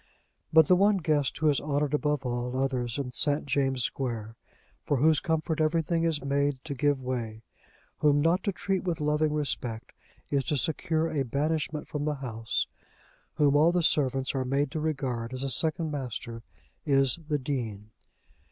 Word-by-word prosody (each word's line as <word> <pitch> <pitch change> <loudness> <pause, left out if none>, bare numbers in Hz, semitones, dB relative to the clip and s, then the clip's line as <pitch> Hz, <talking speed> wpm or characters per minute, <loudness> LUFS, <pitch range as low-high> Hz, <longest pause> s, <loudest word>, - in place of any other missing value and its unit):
But 160 0 +7
the 180 - +5
one 200 +2 +4
guest 150 -6 0
who 155 - +1
is 145 - +2
honoured 145 -1 -1
above 150 -2 0
all 125 +1 -2
others 130 -3 -1
in 135 -3 -3
St. 145 +3 0
James' 135 -2 +1
Square, 115 -4 -3 0.5
for 145 - 0
whose 155 +3 +4
comfort 160 -1 -1
everything 165 +1 +1
is 155 -4 0
made 140 0 +1
to 145 - -4
give 140 0 +1
way, 115 -3 -4 0.6
whom 145 -1 +4
not 165 +5 +2
to 200 - +2
treat 190 0 -2
with 175 -3 -2
loving 150 +1 +1
respect 125 -6 -3 0.4
is 140 -1 +2
to 150 -3 0
secure 160 +3 0
a 145 - 0
banishment 150 +3 -1
from 150 -1 -3
the 150 -1 0
house, 115 -5 -2 0.7
whom 145 -1 +3
all 155 +3 +5
the 175 -1 +1
servants 135 -4 +2
are 135 -1 0
made 135 +2 0
to 155 - -3
regard 130 -6 -2
as 130 - -4
a 135 - -1
second 160 +2 0
master, 120 -4 -5 0.4
is 135 -1 +3
the 150 -2 +1
Dean. 115 -7 -4
145 Hz, 170 wpm, -28 LUFS, 130-155 Hz, 0.7 s, But